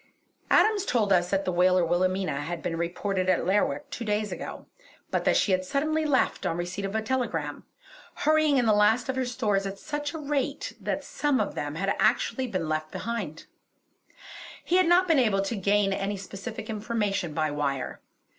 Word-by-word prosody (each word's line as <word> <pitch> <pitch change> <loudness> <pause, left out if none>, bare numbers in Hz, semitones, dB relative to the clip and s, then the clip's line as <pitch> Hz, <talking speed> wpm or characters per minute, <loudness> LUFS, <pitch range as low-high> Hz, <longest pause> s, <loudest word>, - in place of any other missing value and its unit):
Adams 425 -3 +4
told 220 - +2
us 175 -1 +2
that 195 0 0
the 185 - 0
whaler 180 0 +3
Wilhelmina 185 -2 0
had 165 +3 -5
been 175 -2 -2
reported 185 +3 -1
at 185 - +2
Lerwick 275 +10 +1
two 240 - -5
days 210 -1 -1
ago, - - -6 0.5
but - - 0
that - - +4
she 200 - +2
had 185 0 +2
suddenly 310 +9 0
left 285 -3 +1
on 165 - -1
receipt 180 +3 -3
of 195 +2 -4
a 220 - 0
telegram, 215 - -2 0.5
hurrying 310 -2 +3
in 245 - +3
the 220 - +4
last 210 +5 +3
of 265 - 0
her 260 -1 0
stores 205 -5 0
at 195 0 -6
such 295 +4 -4
a 320 - -6
rate 285 -2 -2
that - - -2
some 290 -3 0
of - - -1
them 145 0 -4
had 190 +4 -2
been 195 - +1
actually 240 +2 +1
left 155 -4 -2
behind. 210 -9 -4 1.2
He 360 - +3
had 370 -2 +4
not 360 +2 +5
been 325 -5 +4
able 205 -6 +2
to 195 +4 -2
gain 200 0 +2
any 200 +1 -2
specific 195 +4 -7
information 210 -6 -2
by 155 -2 0
wire. 140 -2 -2
205 Hz, 190 wpm, -27 LUFS, 180-255 Hz, 1.2 s, not